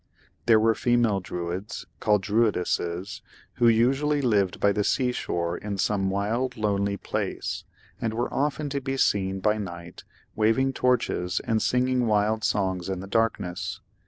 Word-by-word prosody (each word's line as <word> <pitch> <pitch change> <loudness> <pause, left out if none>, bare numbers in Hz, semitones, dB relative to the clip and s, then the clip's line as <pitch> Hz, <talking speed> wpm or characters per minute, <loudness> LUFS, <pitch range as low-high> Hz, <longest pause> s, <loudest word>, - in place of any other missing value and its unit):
There 115 -2 +6
were 115 +1 +4
female 120 -3 +2
Druids, 90 +2 -5
called 105 -3 +2
Druidesses, 95 -4 0 0.4
who 120 - +4
usually 135 +6 +3
lived 105 -8 +1
by 100 - +4
the 105 0 0
sea 125 +4 +1
shore 85 -7 -2
in 100 +1 -5
some 95 0 +1
wild, 115 +6 -1
lonely 100 -2 0
place, - - -3 0.4
and 110 -1 -1
were 120 +2 -2
often 150 +1 0
to 140 0 -2
be 135 0 -3
seen 95 -5 +1
by 105 +2 +2
night 85 -3 -8 0.3
waving 120 +5 +2
torches 120 -9 +1
and 110 -3 0
singing 125 -1 +1
wild 105 +1 +1
songs 95 -4 0
in 95 -1 -2
the 95 - -7
darkness. 100 -4 -1
105 Hz, 150 wpm, -26 LUFS, 95-120 Hz, 0.4 s, There